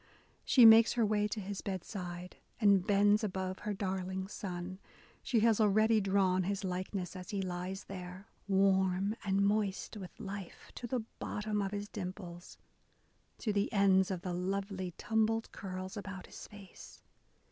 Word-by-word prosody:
She 250 -4 +6
makes 225 0 +9
her 235 -2 +2
way 210 0 +1
to 215 - -4
his 200 0 -5
bedside, 180 -2 -6 0.2
and 200 -4 +4
bends 205 +2 +4
above 185 -2 -3
her 210 0 -3
darling 190 -1 -3
son: 185 -2 -6 0.4
she 230 -4 +1
has 225 -1 +4
already 215 +1 +4
drawn 190 -1 +2
his 195 +2 -2
likeness 185 0 -3
as 185 -1 -8
he 200 - -2
lies 185 +1 -4
there, 185 0 -8 0.2
Warm 190 +1 +2
and 200 0 +2
moist 205 0 0
with 190 -3 -10
life 195 -2 -8
To 240 - -6
the 245 0 -1 0.2
bottom 210 0 -2
of 195 - -1
his 205 0 -4
dimples, 180 -3 -7 0.4
— - - -40
to 215 - 0
the 200 0 0
ends 195 -1 +4
Of 185 -3 -3
the 180 - -3
lovely 190 0 -3
tumbled 225 0 0
curls 185 0 -6
about 195 -2 -7
his - - -10
face 200 -2 -13
195 Hz, 160 wpm, -33 LUFS, 185-210 Hz, 0.4 s, makes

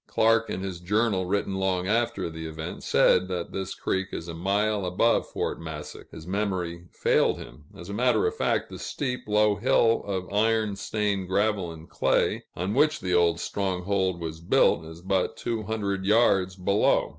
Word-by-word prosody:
Clark, 115 0 +3
in 95 - -3
his 95 -3 -5
Journal 100 0 +1
written 100 0 -1
long 95 -1 0
after 115 -3 0
the 80 -1 -6
event, 80 0 -6
said 90 0 +3
that 90 -2 -4
this 95 -1 -4
creek 95 0 -1
is 85 - -5
a 85 - -5
mile 100 +4 0
above 95 +6 +1
Fort - - -3
Massac; 80 -2 -8
his 80 - -11
memory 90 -3 -2
failed - - +2
him 75 - -11
as 85 - -10
a 100 - -6
matter 125 - +2
of 445 0 0
fact, - - 0
the - - -8
steep, 125 -4 -4
low 105 -1 +3
hill 115 +2 +3
of 95 -1 -4
iron 110 -1 +2
stained 100 -1 -1
gravel 100 -2 0
and 80 0 -11
clay, - - +1
on 95 +4 -2
which 150 +4 +3
the 90 -3 -2
old 85 -1 +3
stronghold 95 -1 -1
was 80 -1 -5
built, 85 -1 +3
is 80 +1 -10
but 95 0 0
two 115 -2 -2
hundred 100 -3 -2
yards 95 -3 +3
below. 100 +2 +2
95 Hz, 180 wpm, -26 LUFS, 90-105 Hz, -, Clark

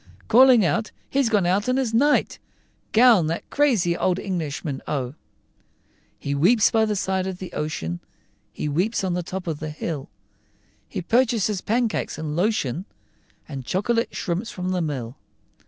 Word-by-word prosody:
Calling 245 -3 +7
out, 220 +5 0 0.2
"He's 270 -3 +2
come 210 -5 +2
out 195 +6 +1
in 255 - +2
his 255 -4 -1
night 285 +6 +2 0.5
Gown, 225 -7 +6
that 165 +2 -3
crazy 230 -13 +2
old 180 +1 +1
Englishman, 155 -7 -3
oh!" 130 -3 -2 1.0
He 140 - -3
weeps 205 +10 +4
by 220 -1 +3
the 210 -1 -1
side 190 -1 -1
of 190 -1 -4
the 185 -1 -8
ocean, 85 - -3 0.5
He 150 - -4
weeps 180 +10 0
on 185 -2 0
the 180 - -1
top 180 +2 -6
of 160 -4 -3
the 155 - -4
hill; 150 -2 -5 0.8
He - - -4
purchases 225 -3 +1
pancakes 230 0 -1
and 150 -1 -4
lotion, 180 - 0 0.6
And 135 -3 -6
chocolate 230 - -1
shrimps 185 +6 -2
from 180 -3 -4
the 185 -1 0
mill. 135 -6 -4
185 Hz, 155 wpm, -23 LUFS, 155-225 Hz, 1.0 s, Calling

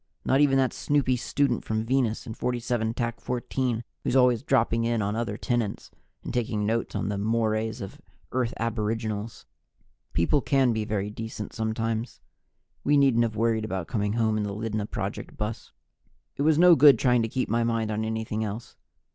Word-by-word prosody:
Not 135 +2 +3
even 135 -2 +4
that 130 -1 +2
snoopy 140 -3 +1
student 125 +1 0
from 110 0 -2
Venus 125 -3 0
in 110 - -6
47 120 -2 -1 0.2
14, 125 -1 -2 0.2
who's 125 - 0
always 125 -3 +4
dropping 115 -5 +2
in 115 0 +1
on 105 0 -1
other 115 -3 -2
tenants 120 -5 -2 0.3
and - - -5
taking 110 -4 -1
notes 115 +2 -1
on - - -1
"the 100 -1 -2
mores 110 +1 0
of 95 - -8 0.3
Earth 125 -2 0
Aboriginals." 110 -1 -3 0.7
People 85 - +2
can 135 -3 +2
be 110 -1 -2
very 105 -1 -2
decent 110 -1 -6
sometimes. 110 +1 -2 0.6
We 145 0 +3
needn't 135 -4 +4
have 115 -2 0
worried 110 0 +1
about 95 -5 -3
coming 105 -3 -1
home 110 -1 +1
in 105 - 0
the 100 -1 -3
Lydna 110 -1 -3
Project 100 -3 -5
bus. 105 +1 -4 0.6
It - - -4
was 155 +1 +4
no 175 0 +8
good 145 0 +7
trying 125 -2 +3
to 115 - -1
keep 130 +3 -1
my 115 +2 +1
mind 115 -2 0
on 110 +1 -1
anything 110 0 -2
else. 110 +2 -6
115 Hz, 175 wpm, -26 LUFS, 110-125 Hz, 0.7 s, no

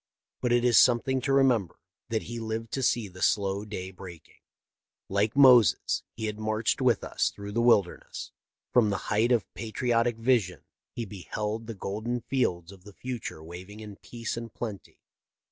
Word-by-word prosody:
But 125 - 0
it 120 0 +3
is 120 -3 +6
something 130 +2 +3
to 135 - -1
remember 125 -9 +3 0.3
that 110 -2 -1
he 120 +1 -6
lived 110 0 -4
to 135 - -2
see 120 -3 +1
the 90 -1 -13
slow 100 -1 +1
day 95 -3 -6
breaking. 90 -3 -12 0.7
Like 100 +4 +1
Moses, 125 -5 +6
he 110 - -4
had 105 0 -4
marched 110 +3 0
with 125 -5 +3
us - - 0
through 100 0 -8
the 115 +3 0
wilderness. 105 -7 +1 0.4
From 115 -4 +5
the 100 - 0 0.2
height 110 +4 +3
of 120 -4 +3
patriotic 115 +1 0
vision 115 - +1 0.3
he 120 - -3
beheld 105 +3 -5
the 115 - -6
golden 110 +5 -3
fields 90 -11 -1
of 95 -2 -15
the 105 0 -13
future 120 -11 -6
waving 90 +5 -10
in 105 -2 -9
peace 115 -1 -6
and 115 -1 -6
plenty. 105 -4 -7
110 Hz, 170 wpm, -28 LUFS, 100-120 Hz, 0.7 s, is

